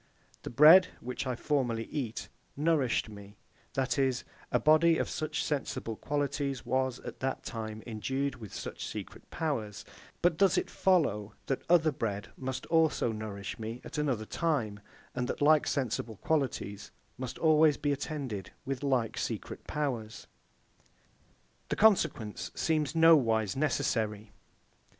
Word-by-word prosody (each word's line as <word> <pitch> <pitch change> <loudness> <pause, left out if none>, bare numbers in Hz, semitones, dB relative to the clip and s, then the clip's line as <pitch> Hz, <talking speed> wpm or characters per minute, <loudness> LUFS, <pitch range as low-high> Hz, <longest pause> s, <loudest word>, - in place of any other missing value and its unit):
The - - -6
bread, 155 +9 +8
which 125 +2 -4
I 125 - -1
formerly 120 -4 0
eat, 120 -3 -4 0.3
nourished 145 -7 +2
me; 100 -1 -12 0.4
that 135 +2 0
is, 130 -3 +1 0.3
a - - +3
body 160 +2 +5
of - - 0
such 155 - -2
sensible 135 -6 -2
qualities 140 0 -2
was, 130 -1 0
at - - -8
that 135 0 -2
time, 110 -2 -6
endued 130 +5 -2
with 110 -4 -10
such - - -6
secret - - -8
powers: 115 -11 -3 0.4
but 170 -2 +3
does 190 -2 +4
it - - -1
follow, 110 - +1
that 135 - -1
other 165 -2 +5
bread 105 -7 -3
must 130 0 -4
also 160 -7 +2
nourish 105 -2 -6
me 115 +2 -5
at 155 - -5
another 130 -8 0
time, 120 -10 -1 0.3
and 125 -1 -2
that - - -3
like 150 +1 +5
sensible 120 -4 -1
qualities 130 -7 -2 0.3
must 130 -1 -5
always 155 -2 +5
be 145 - 0
attended 135 - -4 0.2
with 135 -1 -3
like 130 -5 0
secret - - -5
powers? 125 -7 -3 1.4
The - - 0
consequence 155 - +2
seems 155 -2 0
nowise 120 -11 +5
necessary. 110 -7 -1
130 Hz, 135 wpm, -30 LUFS, 110-150 Hz, 1.4 s, bread